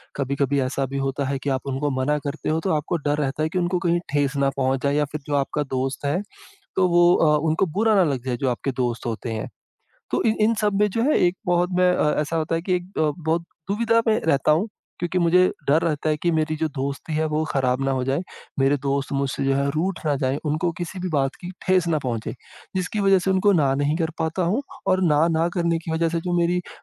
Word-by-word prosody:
कभी-कभी 140 Hz, 0 st, 0 dB
ऐसा 135 Hz, +1 st, -1 dB
भी 135 Hz, +1 st, -5 dB
होता 135 Hz, +1 st, -1 dB
है 140 Hz, 0 st, -1 dB
कि 145 Hz, -, -1 dB
आप 130 Hz, -1 st, 0 dB
उनको 135 Hz, +2 st, -1 dB
मना 150 Hz, +3 st, +1 dB
करते 145 Hz, +2 st, -3 dB
हो 160 Hz, +1 st, +1 dB
तो 190 Hz, -, +1 dB
आपको 155 Hz, +3 st, -1 dB
डर 145 Hz, +1 st, +1 dB
रहता 145 Hz, +1 st, -1 dB
है 155 Hz, -, 0 dB
कि 180 Hz, -, -1 dB
उनको 175 Hz, +1 st, 0 dB
कहीं 170 Hz, 0 st, +3 dB
ठेस 145 Hz, -1 st, +1 dB
ना 135 Hz, -, +4 dB
पहुँच 130 Hz, -1 st, 0 dB
जाए 140 Hz, 0 st, +1 dB
या 150 Hz, 0 st, +2 dB
फिर 155 Hz, -1 st, -5 dB
जो 145 Hz, -, 0 dB
आपका 145 Hz, +2 st, 0 dB
दोस्त 135 Hz, +1 st, -3 dB
है 150 Hz, +7 st, +1 dB, 0.6 s
तो 185 Hz, -1 st, +4 dB
वो 175 Hz, 0 st, +5 dB
अ, 150 Hz, -1 st, +4 dB
उनको 160 Hz, +4 st, +2 dB
बुरा 220 Hz, -1 st, +4 dB
ना 190 Hz, -, +5 dB
लग 125 Hz, -2 st, -4 dB
जाए 125 Hz, -, -1 dB
जो 130 Hz, +2 st, -1 dB
आपके 125 Hz, +3 st, -2 dB
दोस्त 120 Hz, -1 st, -2 dB
होते 115 Hz, +1 st, -3 dB
हैं। 110 Hz, -1 st, -4 dB, 0.6 s
तो -, -, +1 dB
इन 220 Hz, -1 st, +2 dB
इन 225 Hz, +2 st, +4 dB
सब 210 Hz, -1 st, 0 dB
में 210 Hz, -, +5 dB
जो 230 Hz, +4 st, -1 dB
है 300 Hz, -, +3 dB
एक 175 Hz, -, -1 dB
बहुत 175 Hz, 0 st, +2 dB
मैं 180 Hz, 0 st, +4 dB
अ, 150 Hz, -, +2 dB
ऐसा 155 Hz, +2 st, -3 dB
होता 160 Hz, +1 st, -1 dB
है 165 Hz, -, -1 dB
कि 180 Hz, +1 st, 0 dB
एक 180 Hz, +2 st, -5 dB
ब 155 Hz, -2 st, +2 dB
बहुत 165 Hz, +2 st, +1 dB, 0.3 s
दुविधा 230 Hz, +2 st, +2 dB
में 220 Hz, 0 st, +3 dB
रहता 150 Hz, -1 st, +2 dB
हूँ 175 Hz, +9 st, +2 dB, 0.3 s
क्योंकि 175 Hz, +1 st, -1 dB
मुझे 180 Hz, +2 st, +4 dB, 0.2 s
डर 155 Hz, +3 st, +4 dB
रहता 155 Hz, -1 st, 0 dB
है 150 Hz, -, +1 dB
कि 175 Hz, -, +3 dB
मेरी 155 Hz, 0 st, 0 dB
जो 160 Hz, +1 st, 0 dB
दोस्ती 140 Hz, +3 st, -3 dB
है 155 Hz, +1 st, +1 dB
वो 155 Hz, +1 st, 0 dB
ख़राब 130 Hz, -2 st, 0 dB
ना 135 Hz, -, +1 dB
हो 130 Hz, -1 st, 0 dB
जाए। 135 Hz, +5 st, 0 dB, 0.4 s
मेरे 135 Hz, +2 st, +3 dB
दोस्त 140 Hz, 0 st, -1 dB
मुझसे 135 Hz, 0 st, -1 dB
जो 135 Hz, -, +2 dB
है 140 Hz, +1 st, +1 dB
रूठ 175 Hz, +4 st, -1 dB
ना 145 Hz, -2 st, +2 dB
जाए 135 Hz, 0 st, 0 dB
उनको 155 Hz, +3 st, 0 dB
किसी 175 Hz, +2 st, -5 dB
भी 185 Hz, 0 st, -3 dB
बात 135 Hz, -2 st, +1 dB
की 175 Hz, -, -6 dB, 0.2 s
ठेस 185 Hz, -2 st, +3 dB
ना 160 Hz, -, +2 dB
पहुँचे 115 Hz, -4 st, -3 dB, 0.4 s
जिसकी 185 Hz, +3 st, -2 dB
वज़ह 195 Hz, -1 st, +5 dB
से 190 Hz, +1 st, 0 dB
उनको 190 Hz, +2 st, +3 dB
ना 140 Hz, -6 st, +3 dB
नहीं 145 Hz, +2 st, +1 dB
कर 165 Hz, -2 st, 0 dB
पाता 160 Hz, +3 st, -1 dB
हूँ 205 Hz, +11 st, +1 dB, 0.3 s
और 185 Hz, 0 st, +3 dB
ना-ना 160 Hz, +1 st, +3 dB
करने 170 Hz, -2 st, +1 dB
की 165 Hz, -, -6 dB
वज़ह 165 Hz, 0 st, +1 dB
से 170 Hz, -, -1 dB
जो 175 Hz, 0 st, -2 dB
मेरी 175 Hz, +1 st, +2 dB
अ, -, -, -10 dB
155 Hz, 255 wpm, -23 LUFS, 140-175 Hz, 0.6 s, वो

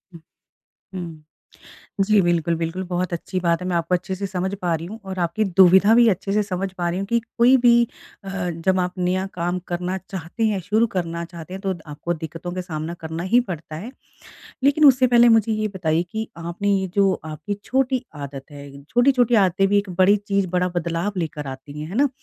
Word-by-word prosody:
हुँ। 165 Hz, -, -12 dB, 0.7 s
हुँ। 165 Hz, -4 st, -7 dB, 0.8 s
जी, 210 Hz, 0 st, +4 dB
बिल्कुल, 170 Hz, -1 st, +1 dB
बिल्कुल, 165 Hz, +3 st, -3 dB
बहुत 180 Hz, 0 st, -2 dB
अच्छी 185 Hz, +2 st, -3 dB
बात 170 Hz, 0 st, +1 dB
है, -, -, -4 dB
मैं 175 Hz, -, 0 dB
आपको 170 Hz, +2 st, 0 dB
अच्छे 185 Hz, +1 st, -2 dB
से 200 Hz, +1 st, -4 dB
समझ 190 Hz, +1 st, -2 dB
पा 170 Hz, -2 st, +1 dB
रही 165 Hz, +1 st, -4 dB
हूँ 220 Hz, +4 st, -8 dB
और 190 Hz, -1 st, -6 dB
आपकी 175 Hz, +6 st, 0 dB
दुविधा 190 Hz, +4 st, +7 dB
भी 240 Hz, 0 st, +6 dB
अच्छे 195 Hz, 0 st, 0 dB
से 210 Hz, 0 st, +2 dB
समझ 195 Hz, -1 st, -3 dB
पा 175 Hz, 0 st, 0 dB
रही 175 Hz, +2 st, -2 dB
हूँ 195 Hz, -, -3 dB
कि 235 Hz, +3 st, +2 dB, 0.2 s
कोई 250 Hz, +3 st, +6 dB
भी 240 Hz, -1 st, +5 dB, 0.5 s
अ, -, -, -7 dB, 0.2 s
जब 185 Hz, +3 st, 0 dB
आप 180 Hz, 0 st, -1 dB
नया 185 Hz, +1 st, 0 dB
काम 175 Hz, +1 st, -1 dB
करना 180 Hz, +2 st, -2 dB
चाहते 190 Hz, +4 st, -4 dB
हैं, 205 Hz, -3 st, 0 dB
शुरू 215 Hz, +6 st, +2 dB
करना 170 Hz, -1 st, -2 dB
चाहते 170 Hz, +1 st, -9 dB
हैं, 195 Hz, -, -6 dB
तो 195 Hz, -2 st, -1 dB
द 165 Hz, -, -13 dB
आपको 150 Hz, +4 st, -4 dB
दिक्कतों 165 Hz, +2 st, -7 dB
का 185 Hz, -, -3 dB
सामना 165 Hz, -1 st, -5 dB
करना 160 Hz, +1 st, -4 dB
ही 245 Hz, -, +7 dB
पड़ता 155 Hz, -2 st, -6 dB
है। 215 Hz, +10 st, -7 dB, 0.7 s
लेकिन 285 Hz, +2 st, +4 dB
उससे 260 Hz, -2 st, +6 dB
पहले 240 Hz, 0 st, +6 dB
मुझे 225 Hz, -1 st, +4 dB
ये 215 Hz, 0 st, 0 dB
बताइए 165 Hz, -2 st, +1 dB
कि 220 Hz, 0 st, -3 dB
आपने 170 Hz, +5 st, -3 dB
ये 190 Hz, -1 st, 0 dB
जो 195 Hz, -1 st, +4 dB
आपकी 155 Hz, +6 st, -5 dB
छोटी 260 Hz, 0 st, 0 dB
आदत 140 Hz, -1 st, -7 dB
है, 140 Hz, -1 st, -11 dB
छोटी-छोटी 245 Hz, -, +3 dB
आदतें 190 Hz, +2 st, +2 dB
भी 205 Hz, +1 st, +3 dB
एक 200 Hz, -1 st, -1 dB
बड़ी 190 Hz, +2 st, +6 dB
चीज़, 200 Hz, -1 st, +1 dB
बड़ा 180 Hz, +1 st, 0 dB
बदलाव 170 Hz, +3 st, -1 dB
लेकर 150 Hz, -4 st, -4 dB
आती 135 Hz, +2 st, -8 dB
हैं। 155 Hz, -, -5 dB
है 195 Hz, -, -6 dB
ना? 280 Hz, 0 st, +4 dB
185 Hz, 215 wpm, -22 LUFS, 170-205 Hz, 0.8 s, दुविधा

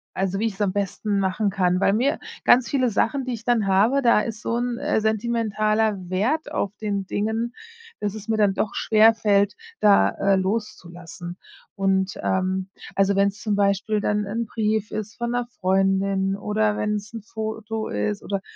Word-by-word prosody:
also, 195 Hz, 0 st, -1 dB
wie 225 Hz, -, +1 dB
ich 210 Hz, -, -4 dB
es 195 Hz, -, -7 dB
am 195 Hz, -3 st, +1 dB
besten 200 Hz, +1 st, -1 dB
machen 195 Hz, +2 st, 0 dB
kann. 180 Hz, -2 st, +1 dB
Weil 195 Hz, -, +3 dB
mir 255 Hz, +7 st, +1 dB, 0.2 s
ganz 245 Hz, -1 st, +5 dB
viele 255 Hz, -3 st, +2 dB
Sachen, 265 Hz, +5 st, 0 dB
die 255 Hz, -, -4 dB
ich 230 Hz, -1 st, -7 dB
dann 235 Hz, -4 st, +2 dB
habe, 215 Hz, +9 st, +3 dB
da 235 Hz, -4 st, +5 dB
ist 220 Hz, -1 st, -5 dB
so 230 Hz, -, -1 dB
'n, 240 Hz, 0 st, -2 dB
äh, -, -, 0 dB
sentimentaler 220 Hz, -1 st, 0 dB
Wert 230 Hz, +13 st, 0 dB
auf 200 Hz, -, -2 dB
den 200 Hz, -2 st, -2 dB
Dingen, 220 Hz, +5 st, -2 dB, 0.5 s
dass 205 Hz, 0 st, -2 dB
es 215 Hz, 0 st, -9 dB
mir 225 Hz, -, +1 dB
dann 205 Hz, -2 st, +3 dB
doch 205 Hz, -, -1 dB
schwer 220 Hz, +1 st, +5 dB
fällt, 205 Hz, -2 st, +2 dB, 0.3 s
da, 205 Hz, -1 st, +5 dB
äh, 200 Hz, 0 st, +1 dB
loszulassen. 175 Hz, -3 st, -4 dB, 0.4 s
Und, 195 Hz, -1 st, +1 dB
ähm 190 Hz, 0 st, -1 dB, 0.3 s
also, 195 Hz, 0 st, +3 dB
wenn's 200 Hz, +1 st, +1 dB
zum 215 Hz, -1 st, -1 dB
Beispiel 200 Hz, +1 st, +1 dB
dann 210 Hz, 0 st, 0 dB
'n 230 Hz, +4 st, -2 dB
Brief 215 Hz, -1 st, -1 dB
ist 215 Hz, +1 st, -5 dB
von 235 Hz, 0 st, -3 dB
'ner 245 Hz, 0 st, -1 dB, 0.2 s
Freundin 195 Hz, +1 st, +1 dB
oder 210 Hz, +1 st, 0 dB
wenn's 210 Hz, +1 st, -3 dB
'n 225 Hz, -, -6 dB
Foto 220 Hz, 0 st, -5 dB
ist 105 Hz, 0 st, -2 dB
oder 200 Hz, -1 st, -3 dB
210 Hz, 180 wpm, -23 LUFS, 195-220 Hz, 0.5 s, ganz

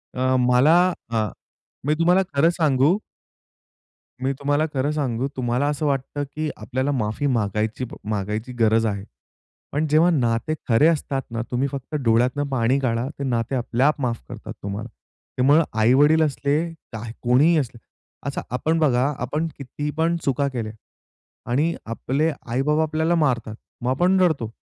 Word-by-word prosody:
अ, 130 Hz, +1 st, +1 dB
मला 125 Hz, +5 st, +4 dB, 0.4 s
हां. 110 Hz, -3 st, 0 dB, 0.6 s
मी 150 Hz, -, +4 dB
तुम्हाला 180 Hz, +3 st, +4 dB
खरं 150 Hz, +4 st, +4 dB
सांगू 150 Hz, +3 st, +3 dB, 1.2 s
मी 135 Hz, +1 st, +1 dB
तुम्हाला 145 Hz, +2 st, +1 dB
खरं 140 Hz, +2 st, 0 dB
सांगू, 135 Hz, -4 st, -1 dB
तुम्हाला 125 Hz, +3 st, 0 dB
असं 150 Hz, +1 st, -1 dB
वाटतं 140 Hz, +1 st, -1 dB
की 155 Hz, 0 st, -1 dB
आपल्याला 130 Hz, +2 st, -2 dB
माफी 125 Hz, +2 st, -1 dB
मागायची 110 Hz, 0 st, -1 dB, 0.2 s
मागायची 105 Hz, +4 st, -3 dB
गरज 110 Hz, 0 st, +3 dB
आहे. 100 Hz, -2 st, -2 dB, 0.7 s
पण 155 Hz, +2 st, 0 dB
जेव्हा 160 Hz, +4 st, +5 dB
नाते 120 Hz, -1 st, +1 dB, 0.2 s
खरे 115 Hz, +8 st, +5 dB
असतात 145 Hz, -4 st, 0 dB
ना, 115 Hz, 0 st, -2 dB
तुम्ही 130 Hz, +3 st, +1 dB
फक्त 140 Hz, +2 st, -6 dB
डोळ्यातून 125 Hz, +5 st, +2 dB
पाणी 130 Hz, 0 st, +2 dB
गाळा. 120 Hz, -1 st, 0 dB
ते -, -, -2 dB
नाते 120 Hz, 0 st, -1 dB
आपल्याआप 130 Hz, +4 st, +1 dB
माफ 120 Hz, -2 st, -1 dB
करतात -, -, -8 dB
तुम्हाला. 105 Hz, +4 st, -4 dB, 0.5 s
त्यामुळं 145 Hz, +6 st, +5 dB, 0.2 s
आई-वडील 145 Hz, +8 st, +5 dB
असले, 145 Hz, 0 st, 0 dB, 0.4 s
काय 110 Hz, 0 st, -6 dB
कोणीही 140 Hz, +7 st, +4 dB
असले. 120 Hz, -4 st, -4 dB, 0.5 s
असं 140 Hz, -, -2 dB
आपण 160 Hz, +5 st, +1 dB
बघा, 140 Hz, -1 st, +2 dB
आपण 150 Hz, +6 st, -1 dB
किती 145 Hz, +2 st, -5 dB
पण 165 Hz, +1 st, +2 dB
चुका 140 Hz, +1 st, +1 dB
केल्या 110 Hz, -3 st, -3 dB, 0.8 s
आणि 155 Hz, +6 st, +1 dB
आपले 135 Hz, +7 st, -1 dB, 0.2 s
आई-बाबा 150 Hz, +6 st, +1 dB
आपल्याला 160 Hz, +2 st, +1 dB
मारतात, 125 Hz, -8 st, 0 dB, 0.3 s
मग 125 Hz, -, -1 dB
आपण 180 Hz, +7 st, +3 dB
रडतो. 140 Hz, -11 st, +1 dB
135 Hz, 145 wpm, -23 LUFS, 120-150 Hz, 1.2 s, जेव्हा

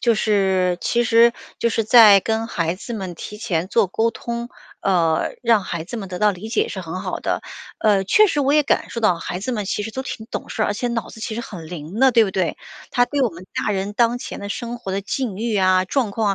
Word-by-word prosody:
就 235 Hz, -1 st, +3 dB
是 190 Hz, -4 st, +1 dB
其 240 Hz, 0 st, +1 dB
实 235 Hz, +1 st, +5 dB, 0.2 s
就 235 Hz, -, +1 dB
是 225 Hz, -1 st, 0 dB
在 215 Hz, -3 st, +8 dB
跟 225 Hz, +2 st, -1 dB
孩 170 Hz, -6 st, -1 dB
子 230 Hz, +5 st, -7 dB
们 190 Hz, -5 st, -5 dB
提 210 Hz, -, -8 dB
前 180 Hz, -4 st, -2 dB
做 220 Hz, 0 st, +3 dB
沟 225 Hz, +5 st, 0 dB
通， 235 Hz, +1 st, -5 dB, 0.3 s
呃， 170 Hz, -5 st, +1 dB
让 230 Hz, -4 st, +3 dB
孩 170 Hz, -3 st, -4 dB
子 230 Hz, +7 st, -6 dB
们 195 Hz, -3 st, -6 dB
得 180 Hz, -1 st, -5 dB
到 210 Hz, +1 st, +4 dB
理 200 Hz, +3 st, -7 dB
解 425 Hz, -, 0 dB
是 -, -, -5 dB
很 -, -, -6 dB
好 -, -, -4 dB
的， -, -, -2 dB, 0.4 s
呃， 205 Hz, -3 st, +3 dB
确 425 Hz, -, +5 dB
实 295 Hz, -7 st, 0 dB
我 280 Hz, +1 st, +2 dB
也 300 Hz, -, +5 dB
感 275 Hz, -, 0 dB
受 -, -, -6 dB
到 215 Hz, -5 st, +4 dB
孩 175 Hz, +2 st, -5 dB
子 255 Hz, +6 st, -3 dB
们 210 Hz, -4 st, -3 dB
其 205 Hz, -, -2 dB
实 220 Hz, -, -5 dB
都 260 Hz, -, -4 dB
挺 225 Hz, -4 st, -6 dB
懂 -, -, -5 dB
事 220 Hz, -, -2 dB
儿， -, -, +2 dB
而 -, -, 0 dB
且 240 Hz, +4 st, -2 dB
脑 235 Hz, -1 st, -3 dB
子 220 Hz, -, -12 dB
其 220 Hz, -, -4 dB
实 235 Hz, -, -4 dB
很 175 Hz, -8 st, -9 dB
灵 175 Hz, +5 st, -6 dB
的， 265 Hz, 0 st, +6 dB
对 230 Hz, -1 st, +6 dB
不 195 Hz, -, -3 dB
对？ 185 Hz, -3 st, -1 dB, 0.3 s
他 245 Hz, -, +3 dB
对 285 Hz, +3 st, -2 dB
我 255 Hz, -, +3 dB
们 180 Hz, -1 st, -12 dB
大 -, -, -1 dB
人 195 Hz, +1 st, -2 dB
当 235 Hz, +2 st, +2 dB
前 245 Hz, -, -7 dB
的， 200 Hz, -, -6 dB
生 235 Hz, +3 st, -5 dB
活 210 Hz, -5 st, -6 dB
的 195 Hz, +1 st, -2 dB
境 225 Hz, 0 st, -3 dB
遇 225 Hz, +2 st, -2 dB
啊、 185 Hz, -2 st, +3 dB
状 235 Hz, +3 st, 0 dB
况 210 Hz, 0 st, 0 dB
215 Hz, 280 characters per minute, -21 LUFS, 190-235 Hz, 0.4 s, 在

